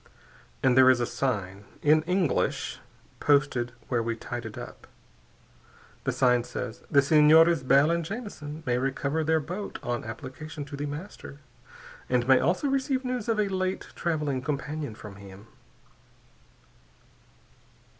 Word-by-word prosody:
"And 130 -2 +4
there 130 0 +7
is 130 -1 +5
a 120 - +1
sign, 100 -7 -2 0.2
in 155 +1 +5
English, 180 -4 0 0.4
posted 140 -4 +2 0.2
where 120 -2 0
we 115 0 -2
tied 120 0 -6
it 110 - -10
up. - - -9 1.2
The - - +1
sign 125 -2 +3
says, 120 -1 -6
'_The 140 -3 +5
Senores 155 +2 +6
Bell 140 +4 +4
and 170 0 0
Jamison 160 -7 -7
may 125 -2 +1
recover 140 +4 -1
their 160 +1 +2
boat 180 +7 -5
on 120 0 -2
application 140 +5 -7
to 145 - -8
The 145 +1 -4
Master, 145 0 -8 0.7
and 125 -1 +1
may 130 -1 +6
also 185 - +1
receive 270 -1 0
news 250 -3 -3
of 225 -2 +1
a 210 - +2
late 185 -1 -2
traveling 150 -6 -1
companion 145 -2 -4
from 105 -2 -11
him. 100 0 -12
145 Hz, 140 wpm, -27 LUFS, 125-165 Hz, 1.2 s, there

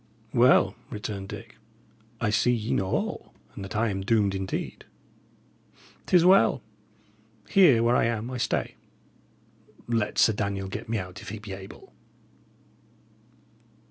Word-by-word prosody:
"Well," 125 +2 +5 0.2
returned 105 -3 -6
Dick, - - -9 0.6
"I 110 -2 0
see 120 +3 +2
ye 115 -2 -1
know 95 - 0
all, - - -3 0.2
and 100 - -8
that 95 0 -7
I 110 +1 +1
am 95 -1 -3
doomed 100 -1 +2
indeed. 95 0 -4 1.2
It - - +2
is 175 -1 +6
well. 185 -9 +5 0.8
Here, 145 - +5
where 120 +1 +3
I - - +3
am, 115 +1 -2
I 130 - -4
stay. 115 - -1 1.1
Let 115 -3 -1
Sir 110 - +5
Daniel 100 -2 -3
get 105 +3 -7
me 115 - 0
out 90 -2 -7
if - - -9
he 110 - -6
be 105 -2 -8
able!" 95 0 -11
110 Hz, 140 wpm, -26 LUFS, 100-120 Hz, 1.2 s, is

